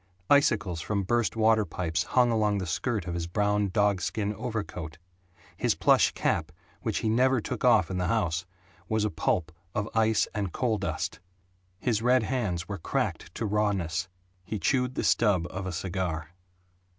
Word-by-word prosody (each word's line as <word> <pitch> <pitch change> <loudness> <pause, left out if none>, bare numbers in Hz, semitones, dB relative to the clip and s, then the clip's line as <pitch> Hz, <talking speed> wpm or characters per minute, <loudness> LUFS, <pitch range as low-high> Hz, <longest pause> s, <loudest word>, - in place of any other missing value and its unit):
Icicles 105 - +3
from 100 +2 -1
burst 120 +4 +1
water 110 -1 +4
pipes 85 -4 -2
hung 125 -2 +3
along 105 -2 +2
the 95 - -2
skirt 100 +4 -1
of 90 - -4
his 85 -1 -3
brown 105 +2 +1
dog 100 -1 +2
skin 105 +2 -1
overcoat; 100 -9 -5 0.6
his - - +1
plush - - +4
cap, - - 0 0.3
which - - -1
he - - +2
never 130 +3 +3
took 105 - -5
off 80 - +4
in 90 - -2
the 90 - 0
house, 90 -5 0 0.4
was 110 -1 +1
a 105 - -1
pulp 80 0 0 0.2
of 105 0 -1
ice 110 -1 +3
and 100 -4 -2
coal 115 -1 0
dust; - - -3 0.6
his 110 0 0
red 125 0 +4
hands 105 -9 -2
were 100 -3 -5
cracked - - -2
to - - -2
rawness; 100 -5 0 0.4
he 105 +4 -4
chewed 125 - +1
the - - -1
stub 100 -7 +3
of 95 0 -4
a - - -3
cigar. 85 -2 -3
105 Hz, 170 wpm, -28 LUFS, 90-110 Hz, 0.6 s, water